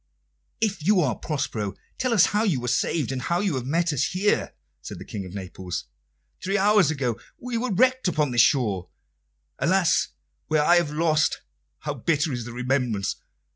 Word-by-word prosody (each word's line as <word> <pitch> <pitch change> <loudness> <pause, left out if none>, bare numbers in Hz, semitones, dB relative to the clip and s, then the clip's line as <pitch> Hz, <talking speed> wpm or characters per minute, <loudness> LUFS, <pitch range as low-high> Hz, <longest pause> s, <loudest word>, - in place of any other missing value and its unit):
"If 210 -7 -1
you 200 +3 +4
are 135 -7 +1
Prospero, 110 - -3 0.2
tell 255 -1 0
us 220 -5 +6
how 210 - +3
you 180 - +1
were 125 - -5
saved, 135 +2 0
and 130 -1 -3
how 170 +6 0
you 195 -3 0
have 130 -2 -3
met 165 +2 +1
us 140 - +1
here," 195 +3 0 0.3
said - - -8
the - - -9
King 100 -3 -6
of 90 - -10
Naples. 95 -2 -5 0.6
"Three 195 +2 +1
hours 205 -5 +4
ago 135 -7 -1 0.2
we 250 -1 -5
were 245 +2 -1
wrecked 255 +4 +3
upon 150 -5 +1
this 120 -1 +5
shore 105 - +2 0.7
alas, 180 -1 +3 0.4
where 155 -1 +2
I 175 +2 +6
have 170 -3 +1
lost 155 0 +1 0.4
how - - -3
bitter 150 -2 0
is 120 -2 -4
the 120 - -7
remembrance! 125 -4 -1
150 Hz, 180 wpm, -25 LUFS, 125-190 Hz, 0.7 s, us